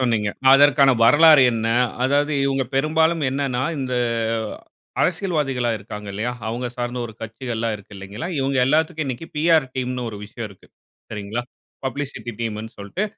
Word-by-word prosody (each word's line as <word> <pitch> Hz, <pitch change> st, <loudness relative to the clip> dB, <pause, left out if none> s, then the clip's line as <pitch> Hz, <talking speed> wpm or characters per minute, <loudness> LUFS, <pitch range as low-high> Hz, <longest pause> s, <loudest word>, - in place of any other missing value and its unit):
சொன்னீங்க. 115 Hz, -5 st, +1 dB, 0.2 s
அதற்கான 140 Hz, 0 st, +6 dB
வரலாறு 155 Hz, +3 st, +7 dB
என்ன? 115 Hz, 0 st, -1 dB, 0.3 s
அதாவது, 145 Hz, +3 st, +2 dB
இவங்க 135 Hz, -1 st, +1 dB
பெரும்பாலும் 160 Hz, +3 st, +2 dB
என்னன்னா, 135 Hz, -2 st, -1 dB, 0.2 s
இந்த 130 Hz, -1 st, -3 dB, 1.1 s
அரசியல்வாதிகளா 150 Hz, -9 st, 0 dB
இருக்காங்கல்லையா, 105 Hz, +2 st, -5 dB, 0.2 s
அவங்க 120 Hz, +2 st, -3 dB
சார்ந்த 120 Hz, 0 st, -3 dB
ஒரு 110 Hz, -, -10 dB
கட்சிகள் 115 Hz, +2 st, -5 dB
எல்லாம் 115 Hz, -1 st, -1 dB
இருக்கு 100 Hz, +1 st, -15 dB
இல்லைங்களா, 100 Hz, -, -6 dB
இவங்க, 135 Hz, 0 st, 0 dB
எல்லாத்துக்கும் 155 Hz, +2 st, +1 dB
இன்னிக்கு 130 Hz, +5 st, -5 dB
பிஆர் 160 Hz, -2 st, +4 dB
டீம் 125 Hz, 0 st, -1 dB
னு 120 Hz, -, -3 dB
ஒரு 105 Hz, -, -8 dB
விஷயம் 110 Hz, +1 st, -7 dB
இருக்கு. 95 Hz, -, -18 dB, 0.4 s
சரிங்களா, 105 Hz, +3 st, -4 dB, 0.4 s
பப்ளிசிட்டி 130 Hz, -2 st, -5 dB
டீம் 110 Hz, -2 st, -2 dB
னு 110 Hz, -, -10 dB
சொல்ட்டு, 100 Hz, -, -3 dB
130 Hz, 145 wpm, -22 LUFS, 115-145 Hz, 1.1 s, வரலாறு